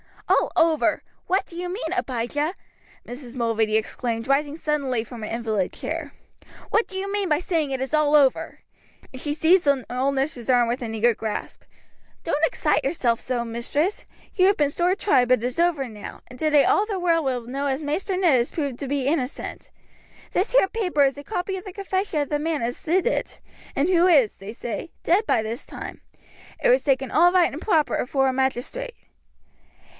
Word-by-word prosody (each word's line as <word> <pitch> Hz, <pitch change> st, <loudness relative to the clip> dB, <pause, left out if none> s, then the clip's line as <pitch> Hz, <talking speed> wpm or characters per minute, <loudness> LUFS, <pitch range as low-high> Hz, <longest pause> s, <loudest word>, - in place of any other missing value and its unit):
"All -, -, +3 dB
over! 325 Hz, -1 st, +2 dB, 0.2 s
what 380 Hz, +2 st, +1 dB
do 335 Hz, -, -14 dB
you 355 Hz, +1 st, -4 dB
mean, 360 Hz, -2 st, -3 dB
Abijah?" 290 Hz, +4 st, -2 dB, 0.5 s
Mrs. 245 Hz, 0 st, -9 dB
Mulready 225 Hz, -3 st, +1 dB
exclaimed, 230 Hz, +1 st, -2 dB
rising 285 Hz, +2 st, +1 dB
suddenly 280 Hz, -7 st, -1 dB
from 230 Hz, 0 st, -10 dB
her 215 Hz, -, -4 dB
invalid 220 Hz, -5 st, -1 dB
chair. 315 Hz, -3 st, -5 dB, 0.6 s
"What 445 Hz, -, +2 dB
do 380 Hz, -, -11 dB
you 390 Hz, +1 st, -3 dB
mean 405 Hz, -2 st, -1 dB
by 300 Hz, -1 st, +3 dB
saying 330 Hz, -5 st, -1 dB
that 270 Hz, -, -1 dB
it 260 Hz, -, -5 dB
is 265 Hz, +3 st, -4 dB
all 300 Hz, -1 st, +3 dB
over?" 275 Hz, -3 st, +2 dB, 0.5 s
and 260 Hz, -, -5 dB
she 290 Hz, -, -1 dB
seized 340 Hz, +3 st, +4 dB
the 280 Hz, -3 st, +2 dB
old 265 Hz, +3 st, 0 dB
nurse's 265 Hz, -3 st, -2 dB
arm 245 Hz, -2 st, +4 dB
with 245 Hz, +3 st, -2 dB
an 225 Hz, -2 st, -4 dB
eager 235 Hz, +2 st, +3 dB
grasp. 215 Hz, -1 st, -5 dB, 0.6 s
"Don't 300 Hz, -2 st, -1 dB
excite -, -, 0 dB
yourself 240 Hz, -8 st, 0 dB
so, 245 Hz, -2 st, -2 dB
mistress. 260 Hz, -, -1 dB, 0.3 s
You 370 Hz, -1 st, +4 dB
have 395 Hz, -, +3 dB
been 290 Hz, -2 st, +2 dB
sore 355 Hz, +4 st, +1 dB
tried, 265 Hz, -12 st, +3 dB
but 255 Hz, 0 st, +4 dB
it -, -, 0 dB
is 250 Hz, +5 st, -3 dB
over 335 Hz, -6 st, +2 dB
now, 210 Hz, -3 st, -9 dB
and 250 Hz, 0 st, -13 dB
today 300 Hz, -2 st, +4 dB
all 410 Hz, -, +3 dB
the 400 Hz, -4 st, -2 dB
world 335 Hz, -3 st, +2 dB
will 255 Hz, -2 st, 0 dB
know 270 Hz, +4 st, -3 dB
as 270 Hz, +2 st, -1 dB
Maister 335 Hz, +6 st, -2 dB
Ned 340 Hz, -9 st, +4 dB
is 240 Hz, -, -1 dB
proved 280 Hz, -6 st, -3 dB
to 280 Hz, -, -4 dB
be 275 Hz, -1 st, -1 dB
innocent. 280 Hz, -3 st, -3 dB, 0.6 s
This 385 Hz, +7 st, 0 dB
here -, -, +5 dB
paper 360 Hz, -10 st, +1 dB
is 275 Hz, 0 st, +1 dB
a 285 Hz, -, -8 dB
copy 380 Hz, +1 st, -3 dB
of 370 Hz, -, -9 dB
the 380 Hz, -, -8 dB
confession 380 Hz, -4 st, -1 dB
of 285 Hz, -, -3 dB
the 295 Hz, -, 0 dB
man 310 Hz, -4 st, -1 dB
as 240 Hz, +2 st, -3 dB
did 365 Hz, +6 st, +1 dB
it, -, -, -1 dB, 0.4 s
and 280 Hz, +4 st, +2 dB
who 355 Hz, -1 st, +4 dB
is, 280 Hz, -, +4 dB
they 195 Hz, +3 st, -8 dB
say, 235 Hz, +5 st, -5 dB
dead 390 Hz, +6 st, +2 dB
by 220 Hz, -, +2 dB
this 225 Hz, +4 st, -5 dB
time. -, -, -8 dB, 0.6 s
It -, -, +4 dB
was -, -, +4 dB
taken 270 Hz, -3 st, +1 dB
all 350 Hz, +2 st, +5 dB
right 360 Hz, -2 st, +4 dB
and 305 Hz, -, -6 dB
proper 325 Hz, -8 st, +2 dB
afore 270 Hz, +1 st, +1 dB
a -, -, -1 dB
magistrate." 265 Hz, -, -2 dB
290 Hz, 205 wpm, -24 LUFS, 250-350 Hz, 0.6 s, here